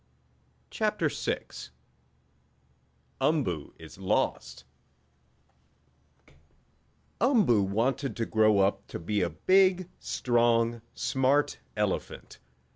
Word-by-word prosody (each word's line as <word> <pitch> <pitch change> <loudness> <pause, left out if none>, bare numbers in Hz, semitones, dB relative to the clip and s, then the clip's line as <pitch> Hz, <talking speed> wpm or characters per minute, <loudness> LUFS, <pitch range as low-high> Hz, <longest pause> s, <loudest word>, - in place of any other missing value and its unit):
CHAPTER - - 0
VI - - -3 1.8
UMBOO 130 - -1
IS 80 +4 -13
LOST 95 -1 -1 2.6
Umboo 215 - +4
wanted 115 +6 -1
to 115 - -2
grow 110 -2 +3
up 100 +1 +1
to - - -6
be 100 +5 -2
a 90 - 0
big, 185 - +2
strong 120 -1 +1
smart 135 +2 +1 0.2
elephant. - - -3
115 Hz, 80 wpm, -28 LUFS, 100-145 Hz, 2.6 s, Umboo